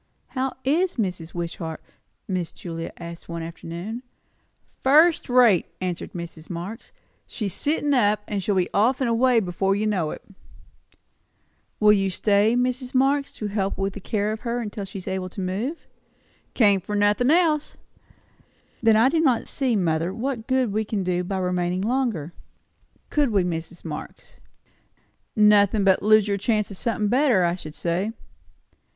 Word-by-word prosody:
"How 265 0 -2
is 340 +7 +1
Mrs. 180 -7 -3
Wishart?" 170 -1 -4 0.5
Miss 180 -3 -2
Julia 165 -2 -6
asked 170 0 -9
one 170 -1 -4
afternoon. 170 +7 -6 0.8
"First 310 +4 +4
rate," 245 -8 +5
answered 180 -2 -4
Mrs. 170 -2 -8
Marx. 180 +7 -7 0.4
"She's 205 -6 -3
sittin' 295 -1 +1
up. 210 -5 +3 0.2
She'll 195 +1 -1
be 185 -2 +2
off 235 +6 +3
and 260 - +1
away 235 +1 +3
before 195 0 0
you 210 +2 -1
know 185 -7 0
it." - - -7 1.6
"Will 210 -1 +6
you 195 -1 +1
stay, 205 +4 +2
Mrs. 250 +1 -1
Marx, 275 +2 +2
to 215 - -6
help 200 -1 -2
in 195 0 0
the 200 - -9
care 210 +1 -1
of 215 - -4
her, 235 0 -3
till 205 -1 -6
she 195 - -8
is 185 - -8
able 190 -1 -3
to 190 - -9
move?" 205 - -3 0.7
"Came 205 -5 +4
for 205 +4 -4
nothin' 205 +5 +2
else." 315 -2 +2 1.0
"Then 225 -1 +5
I 225 +3 +5
do 320 +4 +1
not 260 -8 +2
see, 260 -4 0
mother, 165 -2 0
what 235 +1 -4
good 260 -5 +1
we 215 +1 +1
can 210 -2 -2
do 180 0 0
by 190 +2 -3
remaining 180 0 -1
longer. 220 - -1 0.8
Could 295 -3 +2
we, 200 -4 +2
Mrs. 170 0 -5
Marx?" 150 -2 -8 1.0
"Nothin', 210 -1 +5
but 190 -1 +4
lose 215 0 +5
your 200 -1 0
chance 210 0 0
o' - - -5
somethin' 215 +1 -1
better, 245 -4 +3
I 170 0 +2
should 155 -4 -8
say." 180 +7 -1
205 Hz, 160 wpm, -24 LUFS, 180-245 Hz, 1.6 s, Will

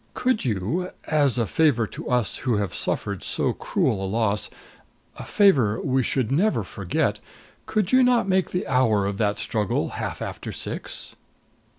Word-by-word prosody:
Could 255 -3 +1
you, 125 - -1 0.2
as 145 -6 +2
a 115 - +2
favor 140 -4 +2
to - - -8
us 125 -4 +1
who 120 -4 0
have 100 -3 -2
suffered 100 -3 -2
so - - 0
cruel 95 - 0
a - - -1
loss 105 -1 0 0.7
a - - -6
favor 135 - +3
we 130 0 +1
should 125 -1 0
never 195 +10 +2
forget - - -1 0.5
could 210 -3 0
you 260 0 +6
not 250 -4 +3
make 190 -1 +2
the 180 - -2
hour 115 -6 +2
of 100 0 -3
that 105 -2 +1
struggle 105 -3 -1
half - - -5
after - - -5
six?" - - -6
125 Hz, 165 wpm, -24 LUFS, -, 0.7 s, you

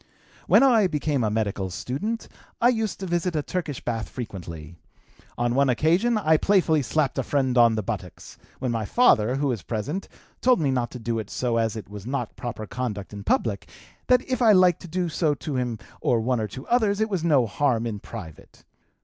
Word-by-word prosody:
"When - - +6
I 230 -7 +5
became 150 -5 -1
a 110 - +1
medical 105 -3 -1
student, 185 - -4 0.3
I 240 - +5
used 220 -4 -1
to - - -3
visit 175 -1 -1
a 150 - 0
Turkish 165 -7 -4
bath 115 -2 -2
frequently; 85 - -7 0.6
on 120 0 0
one 140 +1 +3
occasion 175 - +2
I 160 -6 +3
playfully 170 -5 +3
slapped 135 +1 0
a - - 0
friend 130 -1 0
on 120 -2 +5
the 110 - -2
buttocks, 95 -4 -7 0.2
when 125 - -2
my 115 -2 -1
father, 125 - +3
who 140 0 0
was 115 -6 -2
present, 125 - -4 0.3
told 250 -4 +4
me 145 -4 +1
not 125 -2 0
to - - -8
do 115 -1 -2
so 120 +1 -1
as 115 -1 0
it 110 - -7
was 105 +1 -9
not 140 +2 -3
proper 120 -4 -5
conduct 105 -4 -5
in 100 -1 -7
public, 105 -1 0 0.4
that 250 0 +3
if 255 -1 -1
I 225 -3 +6
liked 185 -3 +4
to - - -9
do 180 +2 -1
so 155 -2 0
to 145 0 -5
him 125 -3 -1 0.2
or 120 - +2
one 125 +2 0
or 110 - -1
two 130 +7 -9
others 215 -4 +2
it 220 - +2
was 190 -6 -2
no 145 -7 +4
harm 120 +1 0
in 110 -3 -3
private. 90 -9 -11
130 Hz, 205 wpm, -25 LUFS, 115-175 Hz, 0.6 s, When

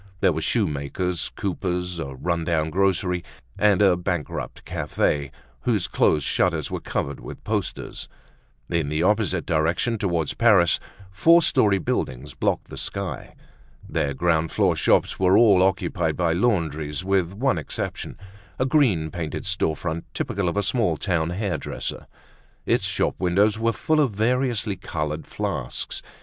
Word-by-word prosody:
There 90 - +3
were 80 - -3
shoemakers, 85 - -1
coopers, 90 -2 -2
a 70 -3 -5
run 85 +4 -1
down 80 -2 0
grocery, 90 -1 +1 0.3
and 105 -1 +4
a 95 -3 +5
bankrupt 90 -3 -4
cafe 70 -2 -1 0.3
whose 110 -7 0
closed 75 -3 +2
shutters - - 0
were - - -2
covered 70 0 -3
with - - -9
posters. - - -4 0.6
In 85 -4 0
the 75 +2 0
opposite 100 -3 +1
direction, 85 +9 +1
toward 85 -6 -1
Paris, 105 -8 +5 0.3
four 165 - +5
story 105 -10 +3
buildings 65 -6 -3
blocked - - -1
the - - -8
sky. - - -4 0.5
Their 70 -1 -1
ground 80 +2 +1
floor - - +2
shops - - +2
were 95 +1 +5
all 100 -6 +6
occupied 90 -4 +1
by 85 -2 +2
laundries 80 -6 0
with 95 -2 +1
one 125 -4 +1
exception—a 95 - -6
green 115 - +2
painted 85 - -4
store 95 -5 0
front 85 0 -4
typical 95 -3 -1
of 85 - -4
a 100 - +2
small 105 -11 +1
town 85 -4 0
hair 90 -2 -2
dresser. - - -5 0.6
Its - - +2
shop - - 0
windows 100 +4 +2
were 115 +1 +2
full 155 +6 +1
of 145 -4 +4
variously 115 -2 +1
colored 75 -3 -4
flasks. - - -3
90 Hz, 145 wpm, -24 LUFS, 80-105 Hz, 0.6 s, all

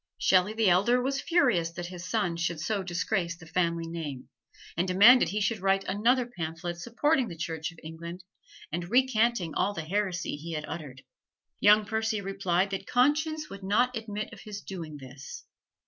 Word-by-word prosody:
Shelley 185 +3 +3
the 220 -1 +2
elder 200 +8 +4
was 270 +2 -1
furious 250 - +2
that 175 +1 -5
his 180 0 -8
son 175 -1 0
should 170 -1 -2
so 200 +6 -1
disgrace 175 -1 -1
the 165 - -13
family 170 0 0
name, 155 -6 -6 0.5
and 175 +3 0
demanded 200 +2 +7
he 205 +4 -1
should 210 +2 0
write 195 +1 +2
another 235 +7 +2
pamphlet 170 -5 -5
supporting 255 - +1
the 170 - -8
Church 160 0 -4
of 165 - -18
England 170 +3 -8 0.5
and 175 +2 -4
recanting 235 - +2
all 205 +1 0
the 160 - -4
heresy 180 -3 -1
he 165 +3 -7
had 155 -1 -3
uttered. 135 -5 -7 0.6
Young 210 +1 +6
Percy 220 0 -1
replied 195 -1 0
that 195 0 -4
conscience 305 +4 +2
would 195 0 -8
not 245 +6 +2
admit 215 -1 -5
of 220 - -11
his 210 -1 -7
doing 165 -6 -7
this. 135 0 -10
190 Hz, 175 wpm, -28 LUFS, 170-220 Hz, 0.6 s, demanded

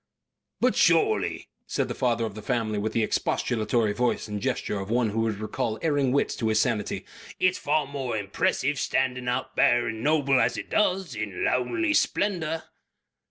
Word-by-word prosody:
"But - - +2
surely," 435 +1 +2 0.2
said - - -1
the - - -3
father 120 -3 0
of 110 - -5
the 110 - -8
family 110 -3 -1
with 110 +1 -2
the 115 - +2
expostulatory 110 0 0
voice 120 0 0
and 105 -1 -4
gesture 125 -5 -2
of 95 +1 -6
one 115 -2 +1
who 115 +2 0
would 110 -2 -1
recall 110 +1 -3
erring 145 -5 +2
wits 140 - +1
to 110 -2 0
sanity, 110 -2 0 0.3
"it - - +2
is - - -7
far 150 0 +1
more 135 -5 -3
impressive 120 +7 0
standing 125 -1 0
out 125 - -2
bare 120 0 +4
and 110 0 -5
noble 140 -3 +3
as 115 0 +1
it - - -7
does. 190 -3 +1
In - - -4
lonely 335 -2 +1
splendour." 165 - 0
125 Hz, 175 wpm, -26 LUFS, 110-145 Hz, 0.3 s, bare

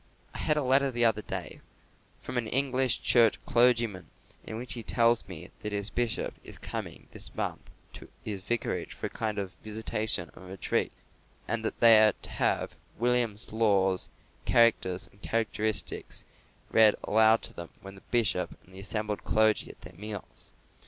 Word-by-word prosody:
I - - -7
had 150 - +1
a 150 - +1
letter 135 +2 +3
the 120 -2 +1
other 110 -2 +2
day - - -6 0.6
from 125 - -3
an 115 - -3
English 130 -1 +1
Church 115 -2 +4
clergyman, 120 -5 +2 0.4
in 110 - -7
which 125 +2 -5
he 120 - -6
tells 115 +1 +2
me 90 -2 -9
that 105 - -4
his 100 0 -3
bishop 120 -2 -1
is - - -10
coming - - -7
this - - -9
month - - -4 0.2
to - - -11 0.2
his 100 -3 -4
vicarage 120 +5 -2
for - - -6
a - - -2
kind 110 -2 -3
of 95 -2 -4
visitation 110 -3 -1
and 95 - -13
retreat, 95 0 -1 0.6
and 115 -1 -1
that 110 - -3
they 115 -2 +9
are 110 -1 +6
to - - -6
have - - 0 0.2
William 120 -2 +2 0.2
Law's 100 -4 +2 0.3
Characters 95 -6 +2
and 100 - -25
Characteristics 110 -1 -2 0.5
read 110 -2 +7
aloud 110 +1 +5
to - - -5
them 85 -1 -7
when 95 0 -9
the 100 - -14
bishop 110 -7 +1
and 95 - -19
the 95 - -9
assembled 105 +1 -4
clergy 110 0 +2
are - - -9
at - - -30
their - - -12
meals. 105 -1 -7
110 Hz, 170 wpm, -28 LUFS, 100-120 Hz, 0.6 s, they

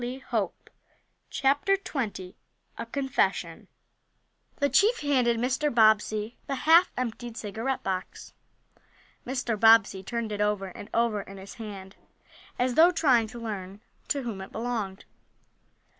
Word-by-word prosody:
Who 240 - -3
was 260 +1 -8
smoking?" 210 -6 -3 0.5
CHAPTER 285 +9 +2
XX 215 - -5 0.5
A 230 - -5
CONFESSION 270 +2 -1 0.9
THE 285 - +1
chief 405 - +3
handed 255 -5 +2
Mr. 265 +5 0
Bobbsey 215 0 +3
the 275 - -2
half 330 +6 +5
emptied 240 -1 -4
cigarette 225 +6 -3
box. 185 -1 -5 0.9
Mr. 245 -4 -2
Bobbsey 225 -3 +5
turned 230 +2 -4
it 205 0 -3
over 210 -2 0
and 205 +4 -10
over 230 -3 +1
in 195 0 -11
his 195 +1 -10
hand, 200 -4 -9 0.6
as 250 0 +1
though 325 +6 +7
trying 260 -10 +3
to 235 +2 -10
learn 200 -4 -6 0.3
to 280 -2 -1
whom 220 -5 -5
it 190 - -9
belonged. 220 -5 -4
230 Hz, 135 wpm, -27 LUFS, 210-265 Hz, 0.9 s, though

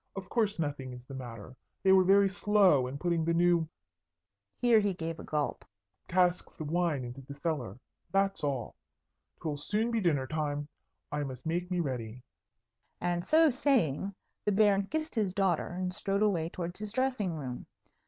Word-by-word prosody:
"Of 195 -2 -7
course, 215 -3 +1
nothing 145 -5 -3
is 125 0 -11
the 135 - -10
matter. 125 -2 -8 0.3
They 190 - +5
were 190 -1 +7
very 195 +2 +5
slow 195 -8 +4
in 130 +2 -5
putting 170 +1 0
the 165 +1 +1
new" 170 -2 +3 0.9
(here 235 -2 +5
he 205 -3 0
gave 165 -1 -4
a - - -7
gulp) 150 -1 -2 0.4
"casks 180 0 +1
of 155 -1 -4
wine 170 -6 +1
into 125 +3 -8
the 140 +2 -10
cellar; 140 - -3 0.3
that's 195 -2 +1
all. 135 -5 -2 0.7
'Twill 150 -2 -2
soon 215 +10 -1
be 230 -2 +1
dinner 150 -8 +2
time. 145 0 -2 0.4
I 150 0 -1
must 130 -3 -7
make 175 +2 -1
me 180 -1 0
ready." 125 -4 -4 0.8
And 175 0 -1
so 315 - +5
saying, 210 - +1 0.3
the 210 - +1
Baron 200 -1 +4
kissed 315 +3 -3
his 205 -5 0
daughter 190 -5 +1
and 180 +1 -3
strode 200 +1 0
away 170 -6 +1
towards 175 +1 -5
his 210 -1 -4
dressing 255 -7 0
room. 130 -5 -6
175 Hz, 175 wpm, -31 LUFS, 145-200 Hz, 0.9 s, were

